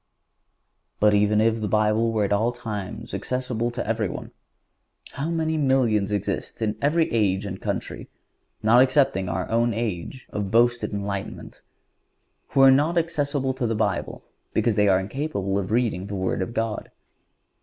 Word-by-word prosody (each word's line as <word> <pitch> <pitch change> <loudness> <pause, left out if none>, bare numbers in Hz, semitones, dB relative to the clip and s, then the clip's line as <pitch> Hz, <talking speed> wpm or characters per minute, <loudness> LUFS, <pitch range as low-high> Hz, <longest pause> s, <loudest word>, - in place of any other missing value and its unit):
But 105 0 +4
even 105 +1 +3
if 115 0 +2
the 105 - -1
Bible 110 +2 +2
were 110 -2 +1
at 100 - 0
all 110 +4 +2
times 110 -6 -6
accessible 125 -2 -2
to 120 0 -4
everyone, 110 -4 -2 0.8
how 140 +4 -3
many 160 -1 0
millions 125 -8 +2
exist 100 -2 -3
in 105 -1 0
every 160 +3 +2
age 100 -3 +1
and 95 -1 -6
country, - - -4 0.5
not 115 +3 +6
excepting 130 -8 +2
our 90 +1 -2
own 115 -1 +2
age 115 +2 -4
of 100 -2 -3
boasted 120 +2 +2
enlightenment, 100 -1 -5 0.9
who 135 - +2
are 135 0 +8
not 150 +6 +2
accessible 145 -5 0
to 130 -2 -2
the 115 - -1
Bible 105 -3 -2 0.3
because 115 - +2
they 105 0 +3
are 95 -1 +4
incapable 100 -3 -2
of 95 - -4
reading 110 -5 0
the 100 - -5
Word 95 0 -1
of 115 +5 -4
God! 115 -2 -2
110 Hz, 155 wpm, -24 LUFS, 100-130 Hz, 0.9 s, are